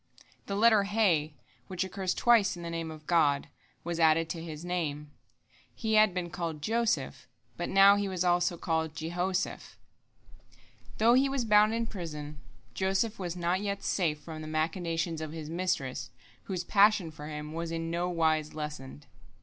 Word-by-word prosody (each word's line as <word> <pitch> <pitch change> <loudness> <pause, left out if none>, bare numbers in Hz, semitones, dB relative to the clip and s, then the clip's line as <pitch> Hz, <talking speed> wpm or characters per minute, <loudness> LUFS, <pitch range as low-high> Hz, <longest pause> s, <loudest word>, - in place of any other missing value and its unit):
The 200 - -2
letter 215 -1 +5
He, 180 -8 +1 0.3
which 185 -1 -2
occurs 190 0 -3
twice 230 -6 +3
in 170 - -8
the 170 - -5
Name 165 -1 -4
of 155 -1 -10
God, 150 -5 +2 0.3
was 170 0 -3
added 160 0 +4
to 165 - -4
his 160 0 -7
name. 150 -5 -3 0.6
He 220 -2 -2
had 215 -1 +6
been 175 -1 -4
called 165 -3 -4
Joseph, 210 - -1 0.3
but 175 - -4
now 195 +1 +7
he 205 0 -1
was 185 -2 -4
called 180 - +3 0.4
also 160 -1 +1
Jehoseph. 175 +5 -3 1.2
Though 230 +2 +5
he 270 +2 +4
was 270 -3 -1
bound 210 +1 +5
in 230 0 -1
prison, 150 -8 -7 0.3
Joseph 195 - 0
was 175 -2 -4
not 175 +2 0
yet 200 -1 -3
safe 160 -6 0
from 155 0 -8
the 155 - -7
machinations 165 +1 -2
of 155 -1 -5
his 160 -1 -7
mistress, 170 -7 -2 0.4
whose 185 -3 -3
passion 200 -3 +4
for 150 -1 -9
him 150 0 -6
was 165 0 -4
in 165 0 -3
no 175 +1 -1
wise 160 -3 0
lessened. 150 -2 -7
170 Hz, 165 wpm, -29 LUFS, 155-195 Hz, 1.2 s, now